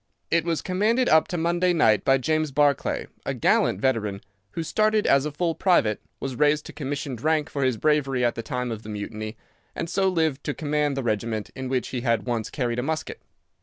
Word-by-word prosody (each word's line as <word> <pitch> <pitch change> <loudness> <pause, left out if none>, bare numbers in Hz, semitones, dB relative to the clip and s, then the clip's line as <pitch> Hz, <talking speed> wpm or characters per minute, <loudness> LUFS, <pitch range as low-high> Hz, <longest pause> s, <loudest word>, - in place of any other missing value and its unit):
It 170 -1 +2
was 165 -2 -1
commanded 220 +7 +1
up 160 0 +5
to 175 - -3
Monday 175 +2 +2
night 110 - +3
by 135 0 +4
James 155 +2 0
Barclay, 145 -1 +1 0.2
a - - -3
gallant 95 - +2
veteran, 105 -5 0 0.3
who 165 - -3
started 215 +5 +2
as 140 +2 +4
a - - -4
full 165 +3 -1
private, 160 - +2 0.2
was 135 -2 -4
raised 150 +2 +2
to - - -9
commissioned 140 -4 -4
rank 155 0 +1
for 140 - -1
his 130 -3 +1
bravery 135 -3 +1
at 120 - +2
the 115 - -5
time 125 +1 -3
of 110 -2 -5
the 110 - -10
Mutiny, 110 +1 -5 0.4
and 165 - -3
so 190 +3 +1
lived 160 -6 0
to 145 - -2
command 150 -2 0
the 135 - -1
regiment 110 -1 -2
in 130 -1 -5
which 130 -3 -1
he 125 - -3
had 115 -5 0
once 115 -2 -2
carried 120 -3 -2
a - - -1
musket. 155 +2 -3
140 Hz, 210 wpm, -25 LUFS, 120-160 Hz, 0.4 s, up